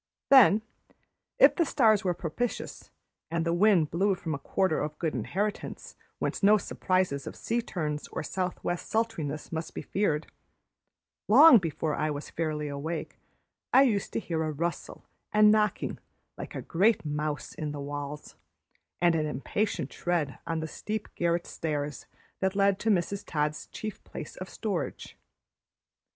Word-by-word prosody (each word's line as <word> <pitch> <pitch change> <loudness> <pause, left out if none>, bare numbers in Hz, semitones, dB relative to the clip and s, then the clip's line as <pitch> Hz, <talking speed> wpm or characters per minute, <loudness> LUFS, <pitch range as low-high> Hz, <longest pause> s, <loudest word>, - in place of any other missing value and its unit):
Then, 220 -5 +7 0.7
if - - +7
the 345 - +3
stars 220 -8 +3
were 180 -2 0
propitious, 195 +9 -4 0.4
and 165 0 -1
the 170 - +1
wind 175 -4 +4
blew 195 +4 +2
from 165 -3 -4
a 140 - -3
quarter 185 +2 0
of 150 0 -3
good 160 -2 -1
inheritance 205 +3 -3 0.2
whence - - -2
no 210 +1 +6
surprises 185 -8 -1
of - - -6
sea 235 +1 -1
turns 150 -8 -3
or - - -5
southwest 180 0 -3
sultriness 160 -10 -2
might 160 0 -4
be - - -4
feared, 165 -7 0 1.0
long 270 +2 +9
before 160 -3 -2
I 155 +1 0
was 145 0 -5
fairly 155 -2 -2
awake 150 +3 -5 0.5
I 270 - +7
used 215 -7 +1
to - - 0
hear 165 -7 -2
a 155 -1 -1
rustle 170 +3 -4 0.3
and 210 0 +6
knocking 210 -1 +1 0.4
like - - -8
a - - -4
great 200 +3 +2
mouse 150 0 -3
in 150 -2 -4
the 145 - -6
walls, 145 +1 -6 0.6
and 175 -1 +4
an 155 -2 0
impatient 155 +2 -2
tread 165 -6 -1
on 165 -1 -1
the 160 - -3
steep 210 +6 -5
garret 170 0 0
stairs 150 -2 -4 0.3
that 190 0 0
led 195 -1 +3
to 225 - 0
Mrs. 200 0 +1
Todd's 150 -1 -2
chief 215 -1 -7
place - - -8
of - - -7
storage. - - -4
170 Hz, 155 wpm, -28 LUFS, 150-205 Hz, 1.0 s, long